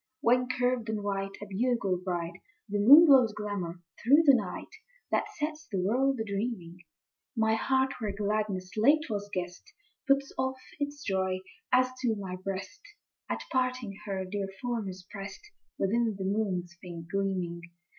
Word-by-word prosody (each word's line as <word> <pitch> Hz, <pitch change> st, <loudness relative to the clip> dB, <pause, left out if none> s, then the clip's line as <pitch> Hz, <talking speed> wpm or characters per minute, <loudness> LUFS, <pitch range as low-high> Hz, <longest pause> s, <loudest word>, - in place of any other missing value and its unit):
II. 260 Hz, 0 st, -57 dB
When 250 Hz, +1 st, +3 dB
curved 250 Hz, -2 st, 0 dB
and 215 Hz, -2 st, -2 dB
white, 195 Hz, -1 st, -2 dB
a -, -, -5 dB
bugle 205 Hz, -1 st, 0 dB
bright, 175 Hz, -2 st, -2 dB, 0.3 s
The 205 Hz, 0 st, -1 dB
moon 285 Hz, +11 st, +10 dB
blows 260 Hz, -7 st, +6 dB
glamour 190 Hz, -5 st, -4 dB, 0.2 s
through 285 Hz, +7 st, +6 dB
the 280 Hz, -, +8 dB
night, -, -, -2 dB, 0.4 s
That -, -, +1 dB
sets 305 Hz, 0 st, -3 dB
the 195 Hz, -, -1 dB
world 255 Hz, +7 st, +2 dB
a -, -, 0 dB
dreaming, 200 Hz, -4 st, -4 dB, 0.6 s
My 220 Hz, 0 st, +3 dB
heart, 265 Hz, +3 st, +2 dB
where 215 Hz, -3 st, -2 dB
gladness 200 Hz, -2 st, -1 dB
late 285 Hz, +7 st, +4 dB
was 205 Hz, -1 st, -3 dB
guest, 180 Hz, -2 st, -5 dB, 0.4 s
Puts 275 Hz, 0 st, +2 dB
off 260 Hz, 0 st, 0 dB, 0.2 s
its 285 Hz, 0 st, -3 dB
joy, 190 Hz, -3 st, 0 dB, 0.3 s
as 255 Hz, 0 st, +5 dB
to 240 Hz, -4 st, +1 dB
my 190 Hz, -3 st, -5 dB
breast 195 Hz, -, -5 dB, 0.5 s
At -, -, -2 dB
parting 255 Hz, -5 st, 0 dB
her 190 Hz, -1 st, -2 dB
dear 195 Hz, +1 st, -3 dB
form 235 Hz, -5 st, -2 dB
is 185 Hz, -1 st, -9 dB
pressed, 200 Hz, -, -8 dB, 0.3 s
Within 225 Hz, +2 st, +1 dB
the 190 Hz, -, -3 dB
moon's 190 Hz, -4 st, -1 dB
faint 170 Hz, -3 st, -8 dB
gleaming. 185 Hz, -3 st, -1 dB
210 Hz, 160 wpm, -30 LUFS, 190-255 Hz, 0.6 s, moon